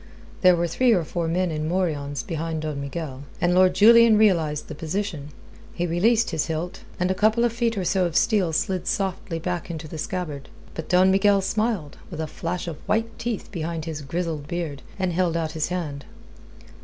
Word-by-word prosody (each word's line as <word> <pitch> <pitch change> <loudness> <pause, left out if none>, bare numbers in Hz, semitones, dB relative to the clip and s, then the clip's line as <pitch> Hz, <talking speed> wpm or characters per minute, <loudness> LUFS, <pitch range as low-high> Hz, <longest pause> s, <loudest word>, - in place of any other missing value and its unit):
There 185 -1 +7
were 170 0 0
three 240 +8 +3
or 180 -5 +2
four 170 +1 -3
men 180 +1 0
in 155 0 -2
morions 150 -6 -1
behind 160 -1 -3
Don 150 -2 -3
Miguel, 140 -1 -6
and 175 0 +2
Lord 185 0 +5
Julian 230 +2 +7
realized 165 -8 +2
the - - -6
position. 160 -1 -3 0.5
He 175 - -1
released 215 +7 +2
his 160 -1 -1
hilt, 165 +2 -4 0.2
and 180 +1 +1
a - - +3
couple 220 +4 +3
of 235 - 0
feet 230 -2 0
or 185 - -1
so 185 +1 +2
of 170 -2 -3
steel 205 -7 +3
slid 180 +3 -1
softly 190 -3 -2
back 175 +1 -3
into 160 -2 -6
the 155 +1 -7
scabbard. 155 -6 -4 0.2
But 160 - -7
Don 185 +1 +5
Miguel 195 +1 +4
smiled, 215 -6 -1
with 160 - -7
a 160 - -1
flash 170 +3 -4
of 165 -3 -5
white 225 +1 -1
teeth 235 -3 -4
behind 165 -3 -4
his 155 -2 -5
grizzled 155 0 -3
beard, 160 -5 -4 0.2
and 185 -2 -1
held 170 -1 +1
out 160 -2 -2
his 160 -1 -1
hand. 155 -6 -4
175 Hz, 195 wpm, -24 LUFS, 155-190 Hz, 0.5 s, There